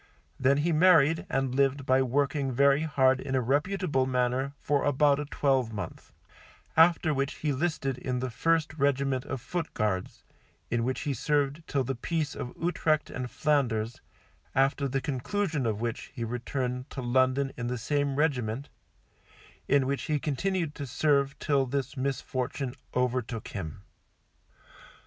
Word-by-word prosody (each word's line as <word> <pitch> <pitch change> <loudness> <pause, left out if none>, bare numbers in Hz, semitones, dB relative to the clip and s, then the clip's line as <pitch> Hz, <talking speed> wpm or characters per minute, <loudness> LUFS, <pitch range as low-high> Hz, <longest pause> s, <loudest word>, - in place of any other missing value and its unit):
Then 135 +2 +4
he 160 +4 +1
married 160 -2 +5
and 135 -1 0
lived 140 0 +1
by 130 0 +4
working 140 +1 0
very 140 +3 +4
hard 135 -4 +3
in 135 0 -3
a - - +3
reputable 145 +2 +1
manner 130 +2 0
for 145 -1 +1
about 145 0 +3
a 150 - -3
twelve 135 -5 +1
month, 105 - -7 0.6
after 165 -1 +5
which 135 0 -1
he 150 -2 -1
listed 135 -3 -1
in 125 -1 -2
the 125 0 -3
first 160 +3 +1
regiment 140 -2 +1
of 130 - -4
Foot 165 +6 -4
Guards, 100 -4 -2 0.5
in 120 -1 +1
which 130 +2 -1
he 145 - -1
served 145 +3 0
till 140 -2 0
the 135 +2 -2
Peace 150 +4 -2
of 125 - -5
Utrecht 155 -2 0
and 125 -1 -4
Flanders, 120 -7 0 0.5
after 135 +1 +2
the 135 0 -1
conclusion 150 - -1
of 110 -1 -2
which 115 -1 -4
he 115 - -3
returned 125 +2 -3
to 135 - -6
London 130 +2 +2
in 120 - -4
the 125 +1 -2
same 140 +3 0
regiment, 135 -4 0 1.0
in 140 -1 +3
which 140 +1 -2
he 150 - +1
continued 160 +3 -1
to 140 -2 -6
serve 140 +1 +1
till 140 -2 +1
this 135 0 -2
misfortune 130 -1 -2 0.2
overtook 125 -2 -1
him. 95 0 -6
135 Hz, 155 wpm, -28 LUFS, 125-145 Hz, 1.0 s, married